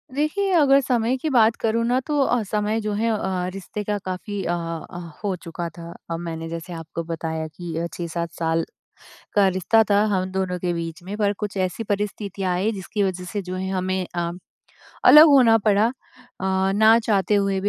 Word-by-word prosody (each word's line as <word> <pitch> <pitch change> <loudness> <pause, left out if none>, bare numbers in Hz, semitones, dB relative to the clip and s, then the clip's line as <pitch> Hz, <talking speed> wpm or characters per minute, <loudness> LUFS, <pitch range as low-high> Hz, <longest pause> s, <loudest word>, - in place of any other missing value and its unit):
देखिए, 380 +7 0
अगर 275 -3 +6
समय 245 -1 +1
की 315 - -1
बात 230 -4 +4
करूँ 230 +1 +1
ना 245 +2 +2
तो 295 -1 0
अ, 245 -3 +2
समय 210 +2 -1
जो 210 -1 -2
है 225 +3 0
अ, 190 -4 -1
रिश्ते 195 +2 -6
का 210 0 -1
काफ़ी 195 +2 -4
अ - - -1
अ, 165 0 -5 0.3
हो 200 -2 0
चुका 170 0 -6
था। 170 0 -8 0.2
अब 165 - -2
मैंने 165 -1 -5
जैसे 170 +1 -6
आपको 165 0 -6
बताया 160 -1 -4
कि 165 +1 -8
अ, 170 +1 -1
6-7 170 -1 -4
साल 165 0 0 0.7
का 200 -2 +5
रिश्ता 190 +4 +3
था 205 +1 +4
हम 185 -1 +1
दोनों 190 -1 -1
के 175 0 -1
बीच 165 0 -5
में 200 +3 -6
पर 205 -1 +1
कुछ 205 -1 -4
ऐसी 185 +4 -1
परिस्थितियाँ 200 -2 -2
आई 195 +5 0
जिसकी 200 +1 -3
वज़ह 185 -2 -2
से 205 - -2
जो 185 0 -6
है 190 +1 -3
हमें 185 0 -1
अ, 170 0 -1 0.7
अलग 305 +2 +10
होना 250 -6 +6
पड़ा 210 +1 +4
अ, 240 - -1 0.5
ना 195 +4 +4
चाहते 205 -2 +2
हुए 195 -1 +1
भी 205 - 0
195 Hz, 195 wpm, -23 LUFS, 175-220 Hz, 0.7 s, अलग